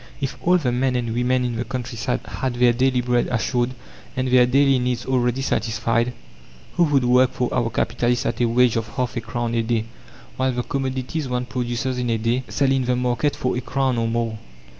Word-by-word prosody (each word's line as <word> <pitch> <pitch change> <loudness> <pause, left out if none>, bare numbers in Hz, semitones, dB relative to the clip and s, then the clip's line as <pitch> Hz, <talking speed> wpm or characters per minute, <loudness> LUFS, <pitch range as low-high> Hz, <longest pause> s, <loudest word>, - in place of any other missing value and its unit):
If 135 -2 -3
all 180 +1 +4
the 135 -8 0
men 125 +1 +1
and 120 -2 -1
women 125 +1 +1
in 120 -2 -2
the 120 - -1
countryside 125 -2 -3
had 130 -2 -3
their 120 0 +4
daily 130 +1 +2
bread 120 0 +1
assured, 125 +1 0 0.4
and 130 0 0
their 125 -1 +5
daily 135 +1 +4
needs 125 -1 -1
already 125 0 0
satisfied, 115 0 0 0.6
who 175 - +3
would 140 -4 +2
work 125 +1 +4
for 125 - -1
our 120 -2 +1
capitalist 120 +2 0
at - - -1
a - - +4
wage 120 0 +3
of 115 -1 -2
half 125 -2 -2
a 120 - -2
crown 115 +1 -3
a 115 - +2
day, 115 -1 0 0.5
while 130 0 +1
the 125 0 -2
commodities 130 +2 -3
one 125 0 -1
produces 125 0 -2
in 125 -1 -1
a 115 - +1
day 115 +3 0
sell 140 -2 +1
in 135 -1 +1
the 125 0 +1
market 125 +3 0
for 125 - -1
a 125 - -2
crown 130 -1 0
or 115 - 0
more? 115 -1 -2
125 Hz, 210 wpm, -22 LUFS, 120-130 Hz, 0.6 s, their